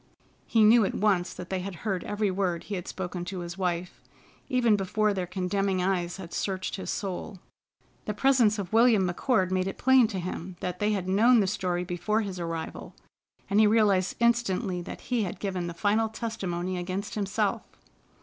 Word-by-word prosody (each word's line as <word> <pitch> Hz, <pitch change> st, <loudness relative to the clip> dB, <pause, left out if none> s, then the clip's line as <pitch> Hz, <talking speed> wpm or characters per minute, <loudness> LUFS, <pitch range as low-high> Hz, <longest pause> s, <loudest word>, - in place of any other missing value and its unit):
He 225 Hz, -2 st, +4 dB
knew 225 Hz, +2 st, +7 dB
at 195 Hz, -, -1 dB
once 195 Hz, -4 st, +1 dB
that 180 Hz, 0 st, -9 dB
they 190 Hz, -, 0 dB
had 185 Hz, 0 st, -5 dB
heard 190 Hz, -4 st, -1 dB
every 205 Hz, -1 st, 0 dB
word 185 Hz, -3 st, -1 dB
he 210 Hz, -, -7 dB
had 180 Hz, -3 st, -4 dB
spoken 180 Hz, -1 st, -4 dB
to 180 Hz, 0 st, -5 dB
his 175 Hz, 0 st, -6 dB
wife, 180 Hz, -2 st, -3 dB, 0.5 s
even 245 Hz, -5 st, +3 dB
before 205 Hz, +2 st, +1 dB
their 185 Hz, -2 st, -3 dB
condemning 190 Hz, +1 st, -1 dB
eyes 180 Hz, -1 st, -1 dB
had 180 Hz, -3 st, -9 dB
searched 190 Hz, -1 st, -2 dB
his 195 Hz, -, -6 dB
soul. 195 Hz, +1 st, -4 dB, 0.7 s
The 210 Hz, -, -3 dB
presence 245 Hz, -4 st, +3 dB
of 200 Hz, -1 st, -5 dB
William 225 Hz, -4 st, +5 dB
McCord 185 Hz, +1 st, +1 dB
made 185 Hz, 0 st, +1 dB
it 195 Hz, -, -5 dB
plain 260 Hz, -2 st, +5 dB
to 210 Hz, -3 st, -5 dB
him 180 Hz, 0 st, -5 dB
that 180 Hz, 0 st, -4 dB
they 210 Hz, +1 st, +1 dB
had 190 Hz, -3 st, -2 dB
known 225 Hz, +6 st, +5 dB
the 205 Hz, -, +3 dB
story 180 Hz, -2 st, -1 dB
before 190 Hz, +5 st, -1 dB
his 195 Hz, -4 st, -5 dB
arrival, 165 Hz, -1 st, -5 dB, 0.5 s
and 200 Hz, -, +2 dB
he 215 Hz, -, +6 dB
realized 205 Hz, -4 st, +3 dB
instantly 230 Hz, -6 st, +1 dB
that -, -, -8 dB
he 245 Hz, -2 st, -1 dB
had 190 Hz, -4 st, -3 dB
given 185 Hz, -3 st, -3 dB
the 170 Hz, -, -6 dB
final 215 Hz, +4 st, +1 dB
testimony 185 Hz, -6 st, -3 dB
against 190 Hz, +5 st, -4 dB
himself. 210 Hz, +1 st, -1 dB
195 Hz, 190 wpm, -27 LUFS, 180-215 Hz, 0.7 s, knew